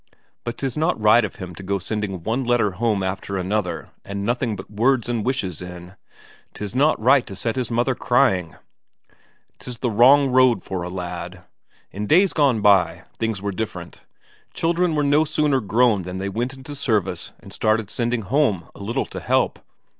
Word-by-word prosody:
But 120 Hz, 0 st, -5 dB
'tis 135 Hz, -3 st, -3 dB
not 160 Hz, -3 st, 0 dB
right 110 Hz, +2 st, +5 dB
of 105 Hz, -, -4 dB
him 90 Hz, -1 st, -8 dB
to 85 Hz, -, -10 dB
go 100 Hz, +1 st, -1 dB
sending 95 Hz, -2 st, -4 dB
one 115 Hz, +7 st, -1 dB
letter 120 Hz, -4 st, +2 dB
home 105 Hz, 0 st, 0 dB
after 95 Hz, +1 st, -3 dB
another 95 Hz, +1 st, -2 dB
and 100 Hz, 0 st, -5 dB
nothing 120 Hz, -1 st, 0 dB
but 95 Hz, -, -9 dB
words 120 Hz, +3 st, +2 dB
and 120 Hz, -3 st, -1 dB
wishes 110 Hz, -, -2 dB
in. 90 Hz, +1 st, -9 dB, 0.6 s
'Tis 105 Hz, -1 st, -5 dB
not 145 Hz, +5 st, +3 dB
right 130 Hz, +3 st, +4 dB
to 100 Hz, -, -7 dB
set 115 Hz, +3 st, -2 dB
his 125 Hz, -3 st, -2 dB
mother 120 Hz, +3 st, +1 dB
crying. 120 Hz, -, +1 dB, 1.0 s
'Tis 125 Hz, -1 st, -6 dB
the 120 Hz, -1 st, -1 dB
wrong 130 Hz, +5 st, +6 dB
road 125 Hz, -6 st, +4 dB
for 95 Hz, -2 st, -4 dB
a 90 Hz, -, -4 dB
lad. 90 Hz, 0 st, -6 dB, 0.5 s
In 105 Hz, +2 st, -4 dB
days 185 Hz, -, +4 dB
gone 135 Hz, -8 st, +2 dB
by, 100 Hz, -4 st, +3 dB, 0.2 s
things 115 Hz, -4 st, -2 dB
were 100 Hz, -, -1 dB
different. 110 Hz, +3 st, -6 dB, 0.5 s
Children 170 Hz, 0 st, +1 dB
were 150 Hz, -, +1 dB
no 145 Hz, +2 st, +4 dB
sooner 150 Hz, -3 st, +1 dB
grown 110 Hz, -1 st, +2 dB
than 90 Hz, +1 st, -6 dB
they 95 Hz, +1 st, -3 dB
went 120 Hz, +6 st, -3 dB
into 135 Hz, +2 st, -9 dB
service 105 Hz, -10 st, -1 dB
and -, -, -12 dB
started 110 Hz, -1 st, 0 dB
sending 120 Hz, -1 st, -1 dB
home 105 Hz, -, 0 dB
a -, -, -13 dB
little 110 Hz, +4 st, -2 dB
to -, -, -7 dB
help. -, -, +1 dB
110 Hz, 185 wpm, -22 LUFS, 95-130 Hz, 1.0 s, wrong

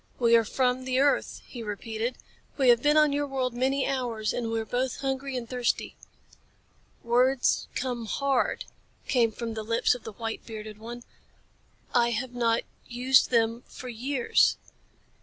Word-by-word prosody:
"We 235 Hz, -1 st, +4 dB
are 230 Hz, -, +5 dB
from 255 Hz, +3 st, 0 dB
the 255 Hz, 0 st, 0 dB
earth," 285 Hz, +1 st, +1 dB
he 240 Hz, -, -9 dB
repeated. 225 Hz, +3 st, -4 dB, 0.4 s
"We 265 Hz, -3 st, +4 dB
have 240 Hz, -1 st, +6 dB
been 295 Hz, +2 st, +4 dB
on 305 Hz, -2 st, +5 dB
your 290 Hz, 0 st, 0 dB
world 260 Hz, -3 st, -1 dB
many 265 Hz, +3 st, +1 dB
hours, 240 Hz, -5 st, -1 dB
and 235 Hz, -2 st, -2 dB
we 225 Hz, 0 st, -1 dB
are 220 Hz, -, -3 dB
both 250 Hz, +3 st, -2 dB
hungry 270 Hz, -1 st, -2 dB
and 235 Hz, -2 st, -5 dB
thirsty." 245 Hz, -1 st, -1 dB, 1.1 s
"Words 250 Hz, +2 st, +2 dB
come 245 Hz, -3 st, -3 dB
hard," 275 Hz, +3 st, 0 dB, 0.4 s
came 235 Hz, -4 st, +3 dB
from 230 Hz, +1 st, -5 dB
the 220 Hz, -, -4 dB
lips 230 Hz, +3 st, +2 dB
of 245 Hz, -, -8 dB
the 220 Hz, -, -7 dB
white 225 Hz, +1 st, -5 dB
bearded 215 Hz, -1 st, -8 dB
one. 240 Hz, +2 st, -8 dB, 0.9 s
"I 235 Hz, -1 st, +4 dB
have 240 Hz, +2 st, -3 dB
not 230 Hz, -2 st, +1 dB, 0.2 s
used 250 Hz, +2 st, +3 dB
them 230 Hz, -1 st, +2 dB
for 250 Hz, -, -9 dB
years." 245 Hz, +2 st, +2 dB
245 Hz, 160 wpm, -27 LUFS, 230-260 Hz, 1.1 s, have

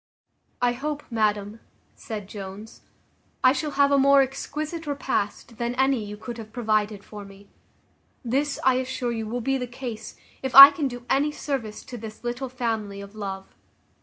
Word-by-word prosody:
"I 245 Hz, -, +4 dB
hope, 295 Hz, +3 st, -4 dB
madam," 210 Hz, -1 st, 0 dB, 0.3 s
said 210 Hz, -4 st, -7 dB
Jones, 200 Hz, +1 st, -9 dB, 0.6 s
"I 255 Hz, 0 st, +6 dB
shall 290 Hz, +2 st, -2 dB
have 280 Hz, 0 st, +4 dB
a 280 Hz, -, +4 dB
more 275 Hz, 0 st, +6 dB
exquisite 305 Hz, +4 st, -5 dB
repast 245 Hz, -5 st, -3 dB
than 240 Hz, +1 st, -2 dB
any 265 Hz, -3 st, +2 dB
you 210 Hz, 0 st, -7 dB
could 235 Hz, +2 st, -7 dB
have 215 Hz, -1 st, -9 dB
provided 215 Hz, -3 st, -1 dB
for 210 Hz, -1 st, -10 dB
me. 200 Hz, 0 st, -15 dB, 0.8 s
This, 275 Hz, +5 st, 0 dB
I 260 Hz, -1 st, +4 dB
assure 255 Hz, -1 st, -2 dB
you, 225 Hz, -2 st, -3 dB
will 245 Hz, +3 st, -3 dB
be 270 Hz, +2 st, 0 dB
the 250 Hz, -, -4 dB
case, 240 Hz, -3 st, -7 dB, 0.3 s
if 265 Hz, -2 st, -3 dB
I 275 Hz, +1 st, +14 dB
can 285 Hz, -1 st, -2 dB
do 245 Hz, -1 st, -8 dB
any 280 Hz, +4 st, +2 dB
service 265 Hz, -8 st, -4 dB
to 245 Hz, -2 st, -9 dB
this 220 Hz, +1 st, -10 dB
little 245 Hz, +2 st, -3 dB
family 225 Hz, -5 st, -3 dB
of 200 Hz, 0 st, -10 dB
love. 195 Hz, -2 st, -6 dB
240 Hz, 170 wpm, -25 LUFS, 215-270 Hz, 0.8 s, I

